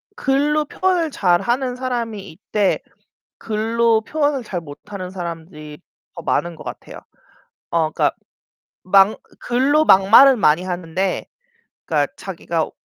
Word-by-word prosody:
글로 295 Hz, +2 st, +1 dB
표현을 360 Hz, 0 st, 0 dB
잘하는 240 Hz, +7 st, +1 dB
사람이 235 Hz, -5 st, -4 dB
있되, 200 Hz, +4 st, -1 dB, 0.6 s
글로 225 Hz, +1 st, +1 dB
표현을 290 Hz, 0 st, -1 dB
잘 180 Hz, -5 st, -4 dB
못하는 185 Hz, +5 st, -9 dB
사람들이 160 Hz, -4 st, -8 dB, 0.4 s
더 170 Hz, -, -8 dB
많은 170 Hz, 0 st, -1 dB
것 -, -, -12 dB
같아요. -, -, -9 dB, 0.7 s
어 160 Hz, -2 st, +1 dB
그러니까 -, -, +1 dB, 0.7 s
막 195 Hz, +3 st, +4 dB, 0.2 s
글로 275 Hz, +6 st, +2 dB
막말을 225 Hz, +7 st, +7 dB
많이 165 Hz, -4 st, +3 dB
하는데 180 Hz, +1 st, -3 dB, 0.6 s
그러니까 -, -, 0 dB
자기가 -, -, -3 dB
210 Hz, 260 characters per minute, -20 LUFS, 175-260 Hz, 0.7 s, 막말을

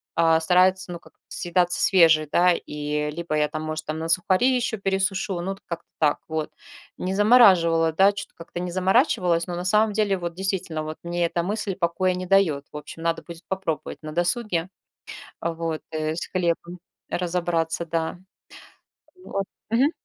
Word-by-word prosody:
а, 165 Hz, -1 st, +4 dB
старается, 185 Hz, +2 st, +3 dB
ну, 170 Hz, -, -6 dB
как -, -, -20 dB, 0.2 s
съедаться 175 Hz, 0 st, 0 dB
свежий, 165 Hz, -5 st, +5 dB
да. 180 Hz, +3 st, +4 dB
И 150 Hz, -1 st, -3 dB
либо 170 Hz, 0 st, -3 dB
я 150 Hz, 0 st, +2 dB
там, 155 Hz, +1 st, -5 dB
может, 155 Hz, 0 st, -4 dB
там 155 Hz, +1 st, -3 dB
на 165 Hz, +1 st, -4 dB
сухари 185 Hz, +9 st, +3 dB
еще 245 Hz, -3 st, 0 dB
пересушу, 195 Hz, -1 st, -1 dB
ну, 180 Hz, +3 st, -3 dB
вот 195 Hz, +1 st, -8 dB
как-то 170 Hz, -1 st, -6 dB
так 150 Hz, -2 st, +3 dB
вот. 160 Hz, -1 st, -3 dB, 0.5 s
Не 185 Hz, +1 st, -2 dB
замораживала, 185 Hz, -7 st, +5 dB
да, 195 Hz, +5 st, +5 dB
чё-то 200 Hz, -, -8 dB
как-то 170 Hz, +1 st, -8 dB
не 180 Hz, 0 st, -4 dB
заморачивалась, 185 Hz, -, +2 dB
но 175 Hz, -, -4 dB
на 175 Hz, -, -4 dB
самом 210 Hz, +3 st, +3 dB
деле 205 Hz, -2 st, +1 dB
вот 170 Hz, -1 st, -4 dB
действительно 185 Hz, -4 st, -1 dB
вот 155 Hz, 0 st, -6 dB
мне 175 Hz, 0 st, -1 dB
эта 170 Hz, 0 st, -1 dB
мысль 205 Hz, 0 st, -3 dB
покоя 185 Hz, +1 st, +1 dB
не 180 Hz, 0 st, -4 dB
дает, 175 Hz, -7 st, +2 dB
в -, -, -11 dB
общем, 165 Hz, +2 st, -9 dB
надо 165 Hz, 0 st, 0 dB
будет 170 Hz, 0 st, -10 dB
попробовать 175 Hz, -6 st, -3 dB
на 155 Hz, -1 st, -7 dB
досуге 175 Hz, +1 st, 0 dB, 0.7 s
вот, 165 Hz, -1 st, -3 dB
э, 155 Hz, 0 st, -2 dB
с 175 Hz, -, -4 dB
хлебом 175 Hz, 0 st, -2 dB, 0.3 s
разобраться, 170 Hz, -2 st, -1 dB
да. 165 Hz, 0 st, -2 dB, 1.1 s
Вот. 195 Hz, 0 st, -3 dB, 0.3 s
Мгм. 255 Hz, +6 st, +3 dB
175 Hz, 170 wpm, -24 LUFS, 165-190 Hz, 1.1 s, свежий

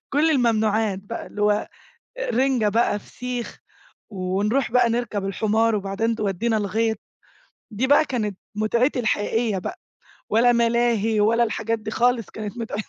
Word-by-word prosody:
كل 310 Hz, +3 st, +3 dB
الممنوعات 220 Hz, -6 st, +1 dB
بقى 205 Hz, +4 st, -7 dB
اللي 210 Hz, -, -5 dB
هو 210 Hz, 0 st, +2 dB, 0.5 s
رِنجة 265 Hz, -, +1 dB
بقى، 210 Hz, -1 st, +1 dB
فسيخ، 245 Hz, +2 st, -6 dB, 0.5 s
ونروح 205 Hz, +6 st, -1 dB
بقى 250 Hz, -1 st, +4 dB
نركب 230 Hz, -4 st, -2 dB
الحمار 220 Hz, +3 st, +1 dB
وبعدين 205 Hz, +3 st, -1 dB
تودينا 215 Hz, +2 st, 0 dB
الغيط، 220 Hz, +2 st, 0 dB, 0.7 s
دي 230 Hz, +4 st, -1 dB
بقى 290 Hz, +3 st, +5 dB
كانت 210 Hz, -8 st, -3 dB, 0.2 s
متعتي 235 Hz, +5 st, +1 dB
الحقيقية 220 Hz, -1 st, 0 dB
بقى، 360 Hz, -, -6 dB, 0.5 s
ولا 235 Hz, +3 st, +4 dB
ملاهي 235 Hz, -2 st, +2 dB
ولا 230 Hz, +3 st, +3 dB
الحاجات 225 Hz, 0 st, -2 dB
دي 215 Hz, 0 st, -6 dB
خالص 240 Hz, -1 st, +1 dB
كانت 215 Hz, +1 st, -7 dB
متع 230 Hz, -2 st, -4 dB
225 Hz, 135 wpm, -23 LUFS, 210-240 Hz, 0.7 s, بقى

